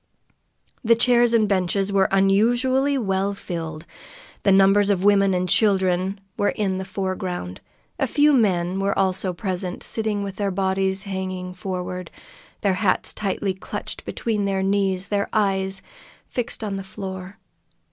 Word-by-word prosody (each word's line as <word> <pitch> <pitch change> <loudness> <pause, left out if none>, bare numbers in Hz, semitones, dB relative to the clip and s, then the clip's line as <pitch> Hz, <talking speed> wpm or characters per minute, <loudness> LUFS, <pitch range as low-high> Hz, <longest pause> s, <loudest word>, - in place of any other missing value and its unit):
The 230 0 +5
chairs 240 0 +4
and 215 -2 +3
benches 195 +1 0
were 195 0 +4
unusually 240 +8 +2
well 200 -3 0
filled. 165 -5 -6 0.6
Numbers 195 +1 +5
of 190 -2 +1
women 200 -1 +4
and 180 0 0
children 190 -1 +2 0.2
were 205 - +2
in 190 -3 -1
the 190 - -4
foreground. 185 - -4 0.4
A - - +1
few 295 +1 +4
men 190 -6 +2
were 195 +1 0
also 190 -1 0
present, 180 -1 -4
sitting 215 -2 -1
with 195 -1 -6
their 200 -1 0
bodies 190 0 0
hanging 185 -2 -4
forward, 180 -1 -5 0.5
their 200 -2 +2
hats 205 - +1
tightly 195 -1 -1
clutched 190 - -6
between 215 -3 -2
their 195 -1 0
knees, 195 -1 0
their 200 -1 0
eyes 195 -2 +1 0.4
fixed 240 -2 -3
on 200 -2 -3
the 195 - -5
floor. 190 +1 -7
195 Hz, 140 wpm, -23 LUFS, 185-205 Hz, 0.6 s, The